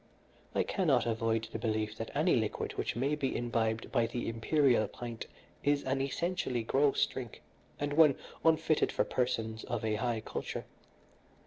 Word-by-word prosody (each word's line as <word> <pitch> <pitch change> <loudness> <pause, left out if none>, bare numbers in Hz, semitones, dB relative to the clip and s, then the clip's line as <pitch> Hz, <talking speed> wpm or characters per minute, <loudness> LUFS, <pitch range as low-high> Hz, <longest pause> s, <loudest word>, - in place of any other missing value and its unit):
I - - +3
cannot 150 - +2
avoid 115 -1 0
the 110 - -4
belief 110 -1 -1
that 115 - -4
any 160 +5 +3
liquid 110 -3 -1
which - - -2
may 135 +5 0
be 140 -3 -1
imbibed 115 -2 -1
by 115 -1 +2
the 120 +1 -4
imperial 120 +1 +3
pint 120 -2 -7 0.4
is 145 0 +2
an 135 +1 0
essentially 140 -3 -1
gross 135 +4 +3
drink, 120 -4 -8 0.4
and 145 0 -1
one 150 -3 +6 0.3
unfitted 160 -1 +3
for - - +1
persons 115 -3 -1
of 115 -2 -3
a 110 -1 +1
high 115 0 -1
culture. - - -5
120 Hz, 155 wpm, -32 LUFS, 115-145 Hz, 0.4 s, one